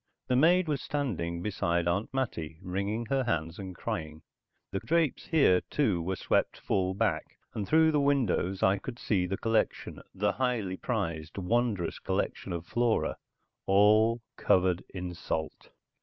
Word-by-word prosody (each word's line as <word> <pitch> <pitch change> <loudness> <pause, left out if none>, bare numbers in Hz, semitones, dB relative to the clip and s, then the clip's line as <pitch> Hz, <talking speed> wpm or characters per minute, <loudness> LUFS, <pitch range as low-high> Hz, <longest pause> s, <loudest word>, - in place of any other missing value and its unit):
The 125 - +3
maid 170 +6 +4
was 145 -3 -1
standing 90 - -2
beside 85 -4 0
Aunt 90 +5 0
Mattie, 85 -12 -3
wringing 100 +5 -2
her 135 +3 0
hands 80 -6 -2
and 95 -2 -7
crying. 80 -2 -5 0.5
The 95 - -1
drapes 165 0 0
here, 140 - +4
too, 105 - +1
were 95 +3 -2
swept - - 0
full 95 -1 0
back, 95 -7 -1 0.2
and 105 -3 -3
through 160 +5 +5
the 150 - +2
windows 125 -9 +1
I 95 +1 +4
could 120 +4 -7
see 95 -7 0
the 95 +2 -2
collection, 115 -1 -1
the - - +1
highly 120 -8 -1
prized, 85 -10 -3
wondrous 100 -2 0
collection - - -2
of 85 -1 -4
flora, 120 +3 0 0.5
all 110 +4 +5 0.2
covered 90 -1 +2
in 90 -1 -5
salt. 80 -2 -4
100 Hz, 150 wpm, -29 LUFS, 90-125 Hz, 0.5 s, through